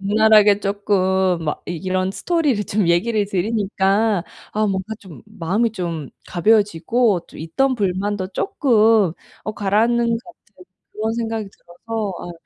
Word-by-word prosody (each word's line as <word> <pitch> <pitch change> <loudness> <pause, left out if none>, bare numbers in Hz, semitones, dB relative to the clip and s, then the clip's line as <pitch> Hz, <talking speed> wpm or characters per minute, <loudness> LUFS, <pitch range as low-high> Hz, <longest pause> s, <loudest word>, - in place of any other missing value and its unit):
적나라하게 210 0 +5
쪼끔 190 -3 +1
막 150 - -3
이런 185 +2 -2
스토리를 290 - 0
좀 200 -1 0
얘기를 205 +5 +2
드리니까 200 0 0 0.3
아 215 0 +1
뭔가 195 +2 -2
좀 185 -6 -13
마음이 210 +3 -1
좀 170 -8 -4 0.2
가벼워지고 210 +1 +2
좀 - - -13
있던 255 - 0
불만도 195 -1 -1
쪼끔 225 - +2 0.3
어 215 - -3
가라앉는 225 +4 +2
것 - - -6
같은 210 - -18 0.3
그런 220 +1 -2
생각이 225 -3 -3
들어서 205 +4 -6
아 175 - -7
205 Hz, 290 characters per minute, -20 LUFS, 185-220 Hz, 0.3 s, 적나라하게